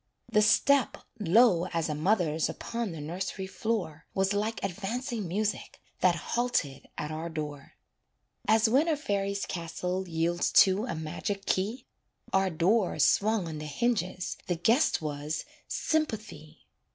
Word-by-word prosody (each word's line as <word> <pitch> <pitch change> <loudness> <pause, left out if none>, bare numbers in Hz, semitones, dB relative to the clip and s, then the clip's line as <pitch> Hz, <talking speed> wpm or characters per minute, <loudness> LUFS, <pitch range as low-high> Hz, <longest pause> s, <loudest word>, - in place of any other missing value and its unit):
The 210 -2 +5
step, 275 +5 +4 0.2
low 190 -2 +4
as 165 -1 0
a 155 - -1
mother's 160 -1 +1
Upon 235 -3 -4
the 165 - -7
nursery 185 +5 -4
floor, 190 -6 -3
Was 195 +1 +2
like 215 +2 -1
advancing 210 +3 -3
music 205 +4 -2 0.2
That 180 -2 +4
halted 170 - -1
at 150 +1 -3
our 160 +2 -4
door. 150 -3 -6 0.7
As 220 +1 +5
when 270 +8 +3
a 315 -2 +2
fairy's 200 -6 -1
castle 180 +2 -3
Yields 170 +1 0
to 195 +3 0
a 170 - -3
magic 175 +5 -4
key, 210 +7 -1 0.5
Our 190 0 +3
door 185 +5 +2
swung 215 -3 +3
on 155 -2 -5
the 150 - -6
hinges 185 - -1
The 175 - +1
guest 225 - +2
was 150 0 -3 0.2
Sympathy. 215 - -3
190 Hz, 140 wpm, -29 LUFS, 165-220 Hz, 0.7 s, The